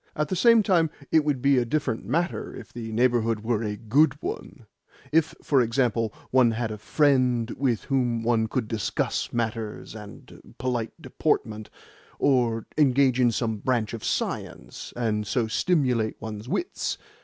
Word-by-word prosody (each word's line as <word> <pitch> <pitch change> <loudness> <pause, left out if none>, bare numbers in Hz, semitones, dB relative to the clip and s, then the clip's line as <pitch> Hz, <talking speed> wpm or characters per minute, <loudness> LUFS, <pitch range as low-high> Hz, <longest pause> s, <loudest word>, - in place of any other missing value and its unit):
"At 150 -1 -1
the - - -1
same 230 +4 +5
time, 170 -5 +3 0.2
it 160 - +5
would 145 -4 -1
be 140 -2 +5
a - - +2
different 120 -2 -1
matter 170 +9 -1
if - - -11
the 115 -2 -6
neighbourhood 115 -1 +1
were 115 -1 0
a 105 -2 -2
GOOD 125 +9 +2
one 410 +6 -6 0.5
if, 160 0 +2
for 140 -3 +3
example, 115 -2 +1 0.2
one 130 -2 +5
had 115 0 -2
a 105 - -6
friend 125 -2 +2
with 125 -5 -1
whom 125 -4 0
one 115 -1 +2
could 115 0 -2
discuss 110 -2 -2
manners 115 -2 -3
and 105 -2 -12
polite 120 +1 -3
deportment, 110 -10 -2 0.5
or 120 -5 +2
engage 130 -2 +4
in 120 -2 +4
some 110 -1 -1
branch 115 0 -1
of 115 - -6
science, - - -4
and 105 -3 -1
so 120 -3 +1
stimulate 125 -4 +1
one's 110 +1 -7
wits. 355 - -2
120 Hz, 155 wpm, -26 LUFS, 110-140 Hz, 0.5 s, same